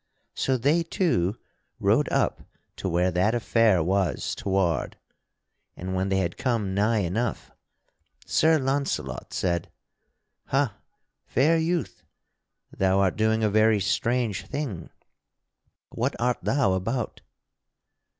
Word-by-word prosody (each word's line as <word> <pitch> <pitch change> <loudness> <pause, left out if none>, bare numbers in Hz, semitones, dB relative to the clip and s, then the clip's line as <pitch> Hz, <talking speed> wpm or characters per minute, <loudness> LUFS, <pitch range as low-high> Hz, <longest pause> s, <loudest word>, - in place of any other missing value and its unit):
So 130 -1 0
they 145 +8 +2
two 120 - 0 0.4
rode - - +2
up - - +1 0.4
to 95 - -3
where 90 +2 +1
that 95 +7 +2
affair 115 -6 +3
was 95 +1 0
toward, 95 -4 -1 0.8
and 95 +1 -5
when 95 +1 0
they 95 - +1
had 85 -3 -2
come 115 -7 0
nigh 105 +2 +2
enough, 110 +8 -2 0.7
Sir 160 0 +3
Launcelot 135 - -2
said: 85 -2 -1 0.8
"Ha, 135 -5 +1 0.5
fair 155 +6 +3
youth, 160 - -2 0.7
thou 95 0 +2
art 95 -2 +2
doing 110 0 +1
a 105 - +3
very 110 0 +4
strange 115 +2 0
thing. 120 - -4 1.0
What - - -2
art 120 +1 +1
thou 135 -8 +2
about?" 115 +7 -2
110 Hz, 115 wpm, -26 LUFS, 95-125 Hz, 1.0 s, very